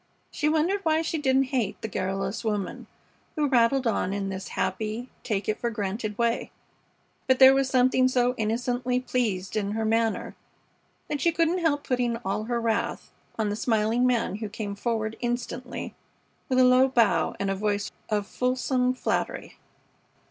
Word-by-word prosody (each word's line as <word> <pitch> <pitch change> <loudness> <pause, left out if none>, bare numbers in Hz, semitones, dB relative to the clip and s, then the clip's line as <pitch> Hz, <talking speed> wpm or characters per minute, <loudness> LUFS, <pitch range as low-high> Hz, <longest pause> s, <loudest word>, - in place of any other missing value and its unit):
She 300 - 0
wondered 320 +6 +2
why 320 -2 +2
she 320 0 -2
didn't 265 -2 +2
hate 215 -6 0
the - - -1
garrulous 195 +3 -3
woman 210 -4 -3 0.5
who 300 -1 +1
rattled 255 0 +3
on 205 -4 0
in 200 -1 -2
this 190 0 -5
happy, 215 +6 -2
take 205 -3 -2
it 215 - -1
for 235 - -1
granted 210 0 -3
way; 235 -1 0 0.8
but 260 -1 +4
there 265 0 +9
was 270 -1 +1
something 255 0 +4
so 250 -1 +2
innocently 245 +3 -1
pleased 220 -7 -2
in 205 -1 -1
her 220 0 -1
manner 225 0 0 0.7
that 295 -1 -3
she 335 - +3
couldn't 335 +2 +1
help 295 -4 +1
putting 245 -2 0
all 205 +3 -1
her 240 0 -1
wrath 230 -1 -2 0.3
on 220 -2 0
the - - -1
smiling 225 +2 +1
man 235 -5 0
who 215 -1 -5
came 205 -1 -5
forward 220 +1 -2
instantly 245 +1 -4 0.6
with 255 - +1
a 255 - +6
low 255 +1 +6
bow 220 -11 +2
and 195 0 0
a - - -1
voice 205 0 -1 0.2
of 210 -2 0
fulsome 255 +1 0
flattery. - - -3
235 Hz, 165 wpm, -26 LUFS, 210-255 Hz, 0.8 s, there